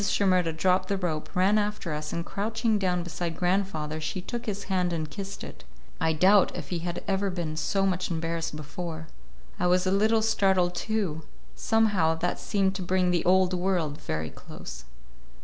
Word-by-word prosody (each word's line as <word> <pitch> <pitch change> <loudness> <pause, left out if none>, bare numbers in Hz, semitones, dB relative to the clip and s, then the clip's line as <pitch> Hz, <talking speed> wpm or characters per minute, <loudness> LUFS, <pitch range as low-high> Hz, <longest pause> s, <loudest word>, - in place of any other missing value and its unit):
Shimerda 185 -4 +2
dropped 185 +2 +2
the 200 - +1
rope, 165 -5 -2
ran 195 +4 +4
after 205 -6 -2
us, 150 0 -4
and 170 0 -3
crouching 220 +1 0
down 180 -2 +1
beside 170 -1 -4
grandfather, 175 -5 0
she 155 +4 -3
took 235 +6 -5
his 200 -1 -3
hand 180 -2 0
and 160 -2 -2
kissed 195 +6 -7
it. - - -9 0.4
I 160 - +2
doubt 185 +5 +4
if - - -6
he 175 - -1
had 175 +1 -4
ever 195 0 +1
been 170 -4 -3
so 195 +4 +1
much 185 -1 0
embarrassed 165 -1 -2
before. 160 +1 -6 0.5
I 180 - +2
was 180 +1 +3
a 185 - +2
little 220 +3 +3
startled, 190 -5 +3
too. 180 -4 -1 0.3
Somehow, 210 -8 +2
that 175 +2 -2
seemed 195 -3 +1
to - - -5
bring 180 0 +2
the 175 -2 +1
Old 185 0 +4
World 175 -5 0
very 80 - -3
close. 65 0 -10
180 Hz, 180 wpm, -27 LUFS, 165-195 Hz, 0.5 s, ran